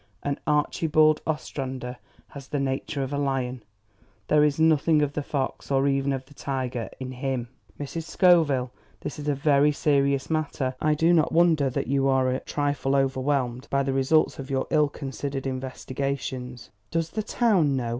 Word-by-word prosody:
And 140 0 -2
Archibald 155 +1 +3
Ostrander 130 -5 -4 0.3
has 140 -2 -10
the 145 - -2
nature 135 +1 -2
of 135 +2 -4
a 140 - -1
lion. 130 -3 -1 0.7
There 150 -1 +5
is 150 0 +1
nothing 160 -1 +4
of 145 -1 -1
the 150 - -2
fox 140 -2 -3
or 135 0 +2
even 135 0 +1
of 135 -1 -3
the 145 - -18
tiger 130 -4 -3
in 130 -1 -5
HIM. 130 -2 -3 0.3
Mrs. 155 +3 -5
Scoville, 160 -8 +3 0.3
this 150 - -6
is 145 - -6
a 145 - +2
very 145 +1 +3
serious 140 -2 +1
matter. 145 -4 -1
I 155 0 +2
do 165 +3 +3
not 160 -2 +3
wonder 165 -5 +4
that 125 - -2
you 135 +1 +1
are 130 -1 +2
a 130 - -1
trifle 145 -2 -1
overwhelmed 135 -1 0
by 140 0 +1
the 135 0 -1
results 135 +4 +2
of 135 0 -7
your 135 -1 0
ill 150 -2 +3
considered 135 -1 -5
investigations." 130 -2 -4 0.2
"Does 165 -1 -1
the 215 - -2
town 200 - +2
know? 120 -2 -2
140 Hz, 175 wpm, -26 LUFS, 130-150 Hz, 0.7 s, There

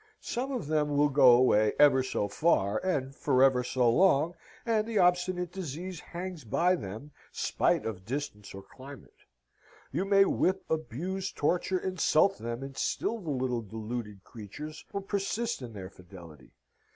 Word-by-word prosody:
Some 260 +3 -3
of 250 - -3
them 150 -1 0
will 145 0 +4
go 135 -3 +6
away 110 -4 +4
ever 140 -3 +6
so 125 -5 -2
far, 100 -4 +1
and 140 -8 -1
forever 130 -2 +3
so 125 0 +1
long, 160 +4 +3 0.3
and 220 -2 +1
the 230 -2 -2
obstinate 180 -1 +2
disease 180 0 -6
hangs 175 -2 -7
by 170 - +2
them, 110 - -8 0.2
spite - - 0
of 105 -5 -5
distance 110 -5 -5
or 95 - -9
climate. 135 +4 -14 0.7
You 175 +7 -1
may 195 0 +5
whip, 190 0 0
abuse, 175 +5 -3
torture, 180 +4 0
insult 185 0 +2
them, 120 +2 -5
and 135 0 -8
still 230 +10 -2
the 170 -6 -7
little 125 -3 -1
deluded 110 -1 -6
creatures 145 +8 -9
will 200 - -3
persist 205 - -2
in 120 -3 -8
their 95 -2 -8
fidelity. 85 -6 -14
145 Hz, 150 wpm, -29 LUFS, 120-185 Hz, 0.7 s, go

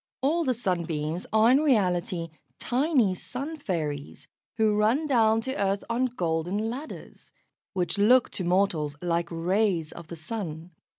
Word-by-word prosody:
All 325 +5 +2
the 255 -4 +1
Sunbeams 170 -6 -2
are 220 +2 +5
in 265 - +5
reality 180 - +1 0.3
tiny 255 - +2
Sun 275 - -5
fairies, 150 - -4 0.3
who 215 -2 +3
run 225 +9 +2
down 225 -5 +3
to 265 +3 -4
earth 200 0 0
on 245 +2 +1
golden 185 0 -1
ladders, 280 +6 -9 0.4
which 185 +1 -1
look 245 +5 +5
to 185 - -3
mortals 175 -5 +1
like 170 0 0
rays 175 -1 0
of 170 -2 -10
the 170 - -7
Sun. 165 -1 -6
200 Hz, 140 wpm, -27 LUFS, 170-240 Hz, 0.4 s, are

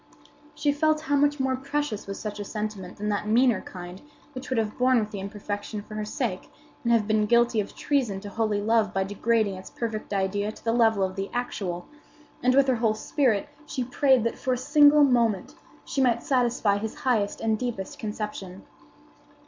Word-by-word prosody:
She 290 -1 +1
felt 310 +1 +1
how 295 -2 0
much 290 +1 +2
more 265 0 +1
precious 275 -5 -3
was 195 - -5
such 210 -1 -5
a - - -3
sentiment 210 -3 -5
than 210 +1 -2
that 205 0 -1
meaner 235 0 +3
kind 180 0 -9 0.3
which 255 -1 -7
would 260 - 0
have 220 0 -1
borne 255 0 +4
with 215 -1 -3
the 205 - -5
imperfection 205 +1 -5
for 215 - -12
her 215 0 -3
sake, 215 -5 -3 0.3
and 235 - +1
have 230 -3 +4
been 215 0 +2
guilty 235 0 +3
of 205 - -4
treason 250 -9 0
to 205 - -7
holy 215 -1 0
love 220 0 +1
by 195 - +2
degrading 205 +1 +1
its 185 - -10
perfect 220 -3 -4
idea 200 +1 0
to - - -16
the 230 - +1
level 225 -4 +3
of 185 0 -2
the 195 0 -3
actual; 190 -8 -3 0.6
and 255 +1 +3
with 275 0 +5
her 255 -2 +2
whole 225 -2 +1
spirit 220 -2 +1 0.2
she 260 - -2
prayed 260 0 +3
that, 230 - -2
for 260 - 0
a - - -1
single 290 +3 +6
moment, 235 -7 +2 0.3
she 275 - -1
might 235 -3 +2
satisfy 240 -6 +2
his 220 +1 -4
highest 220 -6 +1
and 220 -1 0
deepest 235 -7 -4
conception. 210 -3 -5
220 Hz, 195 wpm, -26 LUFS, 205-255 Hz, 0.6 s, single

